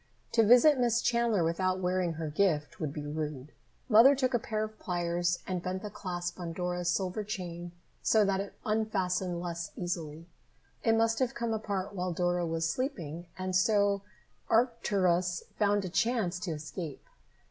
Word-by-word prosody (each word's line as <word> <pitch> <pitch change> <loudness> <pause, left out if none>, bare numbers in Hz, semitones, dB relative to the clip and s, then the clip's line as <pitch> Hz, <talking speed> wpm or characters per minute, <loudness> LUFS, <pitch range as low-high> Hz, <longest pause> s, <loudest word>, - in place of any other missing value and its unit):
To 230 - +4
visit 250 +6 +6
Miss 240 -1 +3
Chandler 235 -6 +2
without 185 +3 0
wearing 180 -1 0
her 160 0 -4
gift 150 -2 0
would 155 -3 -2
be 150 0 -6
rude. 150 -2 -4 0.4
Mother 245 +4 +7
took 260 -1 0
a 240 - +3
pair 215 -1 -2
of 215 0 -7
pliers 175 -1 0
and 185 -2 -2
bent 185 +2 -4
the 210 - -5
clasp 175 -3 -4
on 170 -2 -4
Dora's 180 0 -2
silver 185 +3 -1
chain 175 -4 -5 0.3
so 215 -2 +4
that 195 -1 +1
it 200 0 -5
unfastened 190 -5 0
less 170 -1 -4
easily. 165 -3 -4 0.6
It 225 -1 +4
must 225 0 +2
have 255 -2 0
come 235 -1 -1
apart 205 -2 -3
while 180 -2 -2
Dora 175 0 0
was 165 0 0
sleeping, 170 - -3
and 185 0 -2
so 200 +1 +3 0.5
Arcturus 190 -7 +2 0.2
found 205 -1 +2
a - - -3
chance 195 -2 0
to 180 -1 -3
escape. 155 0 -6
185 Hz, 165 wpm, -30 LUFS, 175-215 Hz, 0.6 s, Mother